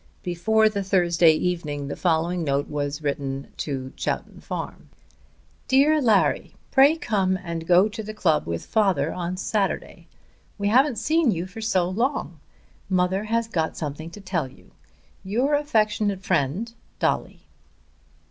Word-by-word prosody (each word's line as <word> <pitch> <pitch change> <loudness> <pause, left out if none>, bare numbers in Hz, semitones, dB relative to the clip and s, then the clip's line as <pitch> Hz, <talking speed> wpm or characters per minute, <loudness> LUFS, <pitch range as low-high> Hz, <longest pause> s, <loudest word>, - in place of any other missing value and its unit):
Before 220 +5 +2
the 205 -2 -1
Thursday 175 -4 +4
evening 155 -4 -2
the 145 - -4
following 170 0 0
note 140 -1 0
was 145 -1 -2
sent 140 -2 -4
to 135 -2 -4
Chowton - - -4
Farm; - - -6 0.8
DEAR 290 +3 +4
LARRY, 220 -6 +2 0.2
Pray 280 +4 +6
come 195 - 0
and 165 -2 -5
go 180 +3 +6
to 220 +1 -6
the 215 0 -7
club 160 - +1
with 85 0 -3
father 185 -9 +1
on 180 0 -3
Saturday. 195 +1 -2 0.5
We 205 -1 0
haven't 255 +2 +4
seen 310 +6 +2
you 175 -4 -1
for 190 +4 -9
so 190 -5 +1
long! 210 - -2 0.5
Mother 185 +2 +1
has 230 +1 0
got 160 -7 -2
something 155 +1 -5
to 205 +5 -11
tell 175 -7 -2
you. - - -19 0.5
Your 245 +9 0
affectionate 215 -8 +1
friend, 185 - 0 0.2
DOLLY. - - -1
185 Hz, 140 wpm, -24 LUFS, 160-220 Hz, 0.8 s, Pray